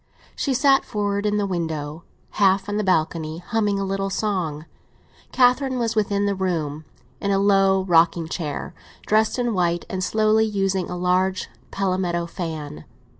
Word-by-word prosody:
She 275 -3 -1
sat 270 +1 +4
forward 205 -1 -1
in 210 0 +1
the 205 - +1
window, 160 -4 -4 0.4
half 195 0 +4
on 205 0 -2
the 215 - 0
balcony, 160 -3 0
humming 205 +2 -1
a - - -1
little 195 0 -2
song. 180 -7 -2 0.7
Catherine 260 +1 +3
was 230 -2 -1
within 205 -1 +1
the 200 - +1
room, 160 -6 -2 0.3
in 200 - -2
a 195 - +2
low 195 -1 +3
rocking 170 -2 +3
chair, 155 -4 -4 0.3
dressed 220 +2 +2
in 240 -2 0
white, 175 -2 0
and 185 -1 -2
slowly 215 +2 +3
using 195 -3 -1
a 180 - -4
large 185 +1 0 0.2
palmetto 185 -3 -1
fan. 155 - -6
190 Hz, 155 wpm, -23 LUFS, 170-210 Hz, 0.7 s, sat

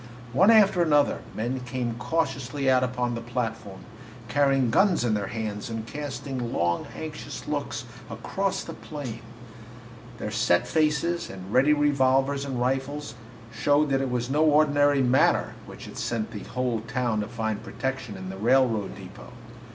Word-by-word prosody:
One 190 - +5
after 205 -5 +6
another, 150 -3 +3 0.2
men 120 +4 -2
came 125 -1 -3
cautiously 135 -3 0
out 130 0 +4
upon 125 -1 -1
the 115 - -4
platform, 115 -5 -4 0.5
carrying 135 -2 +3
guns 190 - +3
in 115 - +2
their 100 -2 -1
hands 110 +1 -4
and 115 -1 -4
casting 135 -3 -5
long, 85 0 0
anxious - - -7
looks - - -3 0.2
across - - -2
the - - -7
plain. 130 -7 -7 1.0
Their 105 - -4
set 105 -5 +2
faces 160 +2 +1
and 95 +1 -8
ready 140 +4 +5
revolvers 140 -1 +2
and 130 -3 -3
rifles 135 +1 -2 0.4
showed 145 +7 +2
that 135 0 +2
it 135 - -1
was 125 -1 -1
no 145 +4 +2
ordinary 145 -2 +4
matter 125 +1 +3
which - - -10
had - - -10
sent 115 -2 -2
the 105 - -6
whole 125 -3 -1
town 120 -4 0
to 105 - -4
find 110 -2 -3
protection 130 -2 -4
in 95 0 -6
the 95 - -8
railroad 115 -2 +2
depot. - - -11
130 Hz, 155 wpm, -26 LUFS, 115-145 Hz, 1.0 s, after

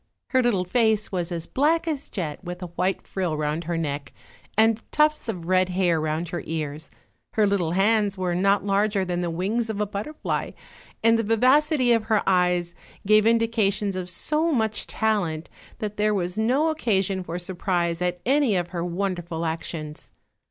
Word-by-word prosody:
Her 260 - +3
little 210 -7 +1
face 220 +1 +1
was 180 -2 -2
as 170 -1 -3
black 320 +5 +1
as 295 -3 -3
jet 165 -4 -4
with 180 0 -6
a - - -4
white 185 +2 -1
frill 180 -5 -2
round 150 +2 -2
her 170 0 -2
neck, 145 -4 -3 0.4
and 225 0 +4
tufts 300 -4 +2
of 180 -6 -4
red 185 +1 +2
hair 180 -3 +1
round 155 +2 -2
her 175 - -3
ears; 155 -1 -4 0.4
her 215 - +3
little 190 -5 +1
hands 205 +1 +2
were 180 -1 -1
not 195 +3 +2
larger 200 0 +1
than 175 -1 -2
the 175 - -1
wings 205 +8 -1
of 215 -2 -3
a 210 - +1
butterfly, 210 +10 -4 0.5
and 230 0 +5
the - - +1
vivacity 255 +4 +3
of 230 -2 +3
her 220 -2 +2
eyes 180 -2 +2 0.3
gave 215 +1 +5
indications 220 -3 +1
of 180 -1 -4
so 310 - 0
much 220 -6 -1
talent 180 -8 -1 0.3
that 210 -1 -5
there 210 0 +2
was 180 -1 -2
no 255 +9 +2
oc 315 0 -3
casion 195 - +1
for 170 0 -5
surprise 175 -1 -1
at 180 0 -1
any 270 -4 +3
of 175 -1 -1
her 170 -1 -3
wonderful 175 -2 -3
actions. 160 -1 -5
195 Hz, 180 wpm, -24 LUFS, 175-220 Hz, 0.5 s, and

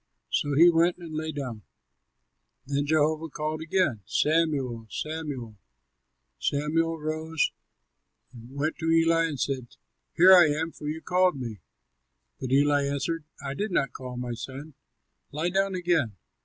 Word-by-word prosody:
So 145 -1 0
he 170 +2 +8
went 170 +1 +3
and 170 -3 -9
lay 155 +1 -3
down. 130 -7 -5 1.0
Then 140 +1 -1
Jehovah 155 +1 +1
called 155 +2 -3
again, 160 - 0
"Samuel! 145 -8 +1
Samuel!" 145 -9 -5 0.8
Samuel 165 +3 0
rose 155 +1 -1 0.8
and 120 0 -12
went 140 +4 -2
to 165 0 -1
Eli 165 0 +4
and 150 -5 -4
said, 130 -3 -3 0.4
"Here 180 +3 +7
am 160 -3 +6
I, - - -16
for 150 - -8
you 160 +1 -4
called 180 -5 +2
me." 115 -5 -6 0.8
But 130 -1 -4
Eli 145 +1 +3
answered, 150 +3 -2 0.2
"I 135 - -2
did 210 +9 -2
not 135 -8 0
call, 125 -1 -7
my 125 -1 -3
son; 135 +6 -8 0.6
lie 155 +4 -1
down 195 +1 +1
again." 170 - +1
155 Hz, 140 wpm, -27 LUFS, 135-165 Hz, 1.0 s, he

